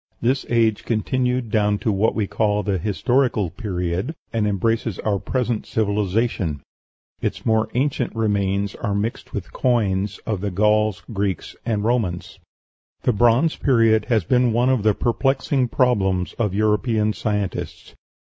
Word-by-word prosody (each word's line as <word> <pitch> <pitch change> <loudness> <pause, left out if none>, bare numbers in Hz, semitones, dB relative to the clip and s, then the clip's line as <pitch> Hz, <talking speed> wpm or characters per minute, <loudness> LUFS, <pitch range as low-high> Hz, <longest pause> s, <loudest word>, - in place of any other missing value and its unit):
This 130 +3 0
age 115 -3 +2
continued 125 +1 -1
down 105 -2 +2
to 110 - -1
what 100 +3 +1
we 110 - 0
call 105 +1 0
the 95 -1 -1
Historical 110 -1 +1
Period, 95 - -3 0.2
and 110 -2 +1
embraces 110 0 0
our 100 -2 -1
present 120 -2 -2
civilization; 100 - -1 0.6
its - - -3
more 110 -1 +2
ancient 130 -3 0
remains 100 -2 0
are 105 -3 -3
mixed 110 +3 -3
with - - -6
coins 105 -6 0
of 105 -4 -2
the 100 - -1
Gauls, 105 +1 +1
Greeks, 100 -4 -2
and 105 -3 0
Romans. 110 -7 -1 0.6
The 125 - +2
Bronze 120 +9 +3
Period 115 -5 +3
has 115 -6 +1
been 125 +4 +2
one 120 +3 +2
of 130 -4 +1
the 105 -1 +2
perplexing 135 +1 +1
problems 95 -8 +1
of 105 -5 0
European 110 +1 +1
scientists. 105 -4 -3
110 Hz, 140 wpm, -22 LUFS, 100-120 Hz, 0.6 s, Bronze